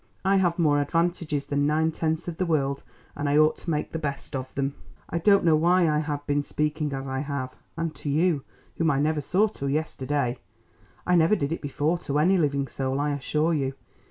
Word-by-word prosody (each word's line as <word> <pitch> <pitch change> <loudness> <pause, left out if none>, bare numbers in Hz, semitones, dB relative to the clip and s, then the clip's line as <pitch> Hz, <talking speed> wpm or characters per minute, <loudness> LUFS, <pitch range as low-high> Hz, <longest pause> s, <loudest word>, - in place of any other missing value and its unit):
I 195 +1 +4
have 175 -3 +2
more 150 -4 +3
advantages 165 -2 0
than 145 0 +1
nine 160 +2 +2
tenths 160 +1 -2
of 170 -2 -4
the 185 - 0
world, 140 -4 0 0.3
and 145 0 -2
I 145 - +3
ought 155 0 +5
to - - -7
make 150 -2 -1
the 160 - -3
best 140 -2 -4
of 130 -1 -4
them. 140 0 -1 0.4
I 170 - 0
don't 200 +1 +4
know 160 -2 +5
why 175 +2 +4
I 150 -1 +2
have 145 -1 -3
been 145 0 +1
speaking 150 +1 -2
as 135 0 -4
I 135 0 -2
have, 140 -2 -4 0.2
and 165 -1 -2
to 145 - -5
you, 155 -1 +2 0.3
whom 165 -1 +2
I 140 -3 +2
never 150 +1 +1
saw 185 +9 +2
till 140 -10 -4
yesterday. 140 -3 -1 0.7
I 180 - +2
never 170 +5 +5
did 140 -6 -2
it 165 - -3
before 150 +4 0
to 145 -2 -2
any 175 +6 +4
living 140 -3 +1
soul, 135 0 -2
I 145 +1 0
assure 150 +4 0
you. 135 -3 -1
150 Hz, 215 wpm, -26 LUFS, 140-165 Hz, 0.7 s, ought